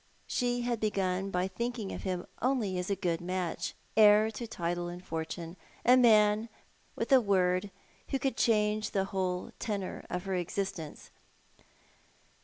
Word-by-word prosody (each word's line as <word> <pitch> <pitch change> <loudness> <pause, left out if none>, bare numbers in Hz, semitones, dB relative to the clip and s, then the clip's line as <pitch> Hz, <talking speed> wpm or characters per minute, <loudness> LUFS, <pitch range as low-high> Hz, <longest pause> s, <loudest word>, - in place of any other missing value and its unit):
She 245 -1 0
had 240 -2 -1
begun 195 -3 0
by 180 -1 0
thinking 225 +2 -3
of - - -5
him 185 -2 -3 0.2
only 240 -7 +1
as 180 - -3
a 200 - +1
good 175 -3 -1
match, 180 -1 -3 0.2
heir 215 0 +6
to 235 +1 -6
title 175 -4 -2
and 175 +1 -8
fortune, 165 +2 -5 0.3
a 250 +1 +7
man 215 -3 +5
who, - - -16 0.5
with - - -3
a 265 -2 +7
word, 185 -2 +2 0.4
could 270 0 0
change 215 -1 +2
the 195 -1 0
whole 185 -2 -2
tenor 200 -4 -3
of 180 0 -3
her 195 - -2
existence. 180 -2 -4
195 Hz, 150 wpm, -31 LUFS, 180-220 Hz, 0.5 s, a